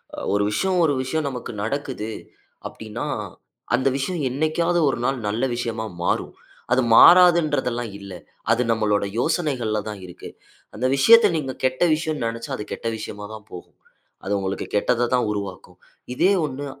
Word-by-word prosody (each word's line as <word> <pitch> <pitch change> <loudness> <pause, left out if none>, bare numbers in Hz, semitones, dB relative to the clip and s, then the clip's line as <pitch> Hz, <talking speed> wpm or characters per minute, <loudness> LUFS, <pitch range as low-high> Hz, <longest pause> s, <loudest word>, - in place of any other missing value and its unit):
அ - - -17 0.2
ஒரு 100 - +2
விஷயம், 190 - 0
ஒரு 150 - +3
விஷயம் 155 +4 -2
நமக்கு 125 -3 -6
நடக்குது 125 -2 -3 0.6
அப்டின்னா 110 +1 -7 0.7
அந்த 130 +2 0
விஷயம் 160 +4 -2
என்னைக்காவது 155 +6 0
1 135 - -1
நாள் 135 +1 0
நல்ல 110 +4 -1
விஷயமா 115 -2 -3 0.2
மாறும். - - -1 0.4
அது 130 +1 +4
மாறாதுன்றதுல்லாம் 155 - +5
இல்ல. 100 -1 -10 0.4
அது 115 +2 +3
நம்மளோட 105 -2 +1
யோசனைகள் 130 -9 0
தான் 105 -2 -7
இருக்கு. 90 - -10 0.5
அந்த 125 +4 -2
விஷயத்த 225 +10 +7
நீங்க 135 -3 -3
கெட்ட 130 +5 +1
விஷயன் 155 -5 -3
நெனைச்சா 115 0 -4
அது - - -5
கெட்ட 115 - -5
விஷயமா 105 -1 -7
தான் 110 -1 -10
போகும். 90 - -11 0.5
அது 100 +2 -2
உங்களுக்கு 95 0 -3
கெட்டத 120 +3 +2
தான் 125 -2 +2
உருவாக்கும். 95 -3 -6 0.4
இதே 180 +9 +3 0.2
ஒண்ணு 140 0 -5
125 Hz, 150 wpm, -23 LUFS, 110-150 Hz, 0.7 s, விஷயத்த